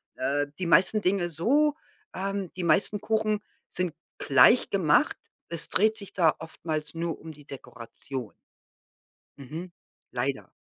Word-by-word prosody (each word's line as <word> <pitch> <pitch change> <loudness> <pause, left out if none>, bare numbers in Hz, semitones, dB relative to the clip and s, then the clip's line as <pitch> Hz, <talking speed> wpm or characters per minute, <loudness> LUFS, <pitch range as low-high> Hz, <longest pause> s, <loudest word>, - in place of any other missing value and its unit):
Äh, 145 +3 0
die 180 - -1
meisten 205 +5 +4
Dinge 185 -2 +1
so 280 - +2 0.4
ähm, 195 -1 -3
die 185 - -4
meisten 195 +5 +2
Kuchen 215 -1 0 0.3
sind 180 -3 -2 0.3
gleich - - +6
gemacht. - - +3 0.3
Es 170 -1 -3
dreht 215 +3 +3
sich 200 -3 -8
da 165 -5 +4
oftmals 155 -2 -5
nur 165 0 -3
um 160 0 -9
die 145 -1 -15
Dekoration. 125 -2 -8 1.0
Mhm. 160 +7 -8 0.4
Leider. 130 +2 -2
170 Hz, 130 wpm, -27 LUFS, 150-200 Hz, 1.0 s, gleich